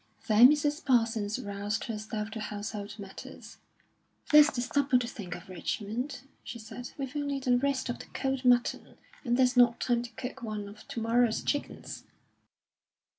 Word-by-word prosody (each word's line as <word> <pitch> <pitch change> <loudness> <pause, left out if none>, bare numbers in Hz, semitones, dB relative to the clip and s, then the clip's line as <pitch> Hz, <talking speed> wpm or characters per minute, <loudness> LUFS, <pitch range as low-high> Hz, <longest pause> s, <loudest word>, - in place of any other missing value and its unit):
Then 230 +3 +8
Mrs. 295 +2 +1
Parsons 225 -4 +2
roused 205 -2 -3
herself 215 -2 -4
to 220 - -5
household 210 -1 -5
matters. 195 -2 -10 0.7
"There's 300 0 +9
the 250 - -4
supper 275 +1 +2
to 245 -1 -1
think 195 -7 -6
of, 175 - -11
Richmond," 220 - -4 0.2
she - - -7
said; 235 +2 -8
"we've 270 0 -5
only 285 -1 -1
the 250 -2 +2
rest 275 0 0
of 245 - -4
the - - -10
cold 270 -1 -2
mutton, 245 -1 +2 0.3
and 240 -2 +1
there's 255 -1 +3
not 240 -1 +5
time 240 -1 +1
to 245 - -7
cook 260 +3 -6
one 215 -3 -4
of 205 +1 -13
to - - -5
morrow's 230 0 +2
chickens." 290 - -3
240 Hz, 165 wpm, -30 LUFS, 215-260 Hz, 0.7 s, There's